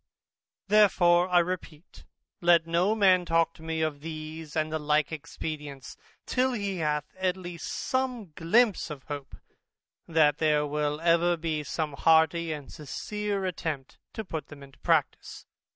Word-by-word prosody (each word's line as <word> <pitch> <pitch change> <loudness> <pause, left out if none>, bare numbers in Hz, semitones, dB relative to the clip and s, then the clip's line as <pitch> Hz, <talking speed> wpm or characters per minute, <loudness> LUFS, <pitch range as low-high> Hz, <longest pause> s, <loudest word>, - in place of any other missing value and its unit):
Therefore 185 -4 +4
I 180 - +4
repeat, 175 -2 -3 0.4
let 170 -1 +5
no 175 +6 +2
man 190 -4 +4
talk 165 -1 +2
to - - -17
me 160 0 -3
of 150 -2 -2
these 155 0 -7
and 155 0 -1
the 160 - 0
like 150 0 +1
expedients, 145 -4 -6 0.3
till 255 0 +1
he 200 -4 -2
hath 150 -2 -2
at 185 0 0
least 175 -2 -7
some 255 -8 -2
glympse 210 +3 +2
of 145 -4 -8
hope, 145 -2 -7 0.7
that 155 -2 +3
there 150 -2 +2
will 150 0 -1
ever 170 +1 +3
be 160 -2 -2
some 150 +2 -3
hearty 160 +2 +3
and 150 -3 -7
sincere 200 +7 -4
attempt 160 -7 -4
to 220 - -5
put 160 -4 -5
them 145 -1 -12
into 135 -1 -16
practice. - - 0
165 Hz, 150 wpm, -28 LUFS, 150-180 Hz, 0.7 s, let